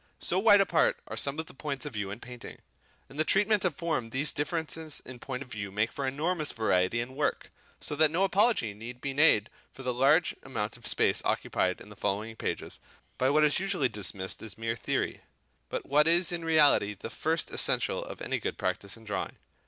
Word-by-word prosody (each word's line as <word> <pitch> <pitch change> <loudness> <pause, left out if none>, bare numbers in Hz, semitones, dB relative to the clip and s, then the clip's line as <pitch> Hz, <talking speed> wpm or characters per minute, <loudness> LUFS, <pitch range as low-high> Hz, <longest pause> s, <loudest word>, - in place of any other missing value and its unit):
So 180 - -1
wide 205 -1 +7
apart 175 -4 +2
are - - -6
some 140 +1 -1
of 160 - -2
the - - -13
points 140 0 -4
of 145 - -6
view 100 -2 -3
in 105 +3 -6
painting. 125 -1 -10 0.5
In 135 - -13
the 155 - +3
treatment 205 +4 +3
of 180 -6 0
form 155 -9 -2
these 135 +5 +1
differences 160 0 -2
in 130 -2 -9
point 130 0 -5
of 125 - -18
view 100 -3 -5
make 105 +3 0
for 140 -1 -3
enormous 155 +3 0
variety 110 -1 +1
in 120 +1 -3
the - - -13
work. 145 +2 -2 0.3
So 150 - -4
that 155 +1 +5
no 170 +5 +1
apology 195 - +3
need 120 +4 -9
be 140 +1 -3
made 135 -8 +5 0.2
for 135 - -10
the 125 -1 -1
large 140 +7 +3
amount 115 -5 -4
of 120 - -7
space - - +3
occupied 90 0 0
in - - -13
the 105 - -12
following 105 +3 -2
pages - - -4 0.4
by 130 - +3
what 155 +2 +4
is 150 +1 +3
usually 185 -9 0
dismissed 100 -3 -3
as 110 -4 -7
mere 115 0 -2
theory; - - -2 0.5
but - - -4
what 150 +2 +4
is 170 +2 +5
in 170 -1 -3
reality 150 -10 +4
the - - -8
first - - -1
essential - - +1
of - - -8
any - - -1
good - - -4
practice 100 +2 -2
in 115 - -16
drawing. 105 -2 -4
135 Hz, 215 wpm, -29 LUFS, 110-160 Hz, 0.5 s, wide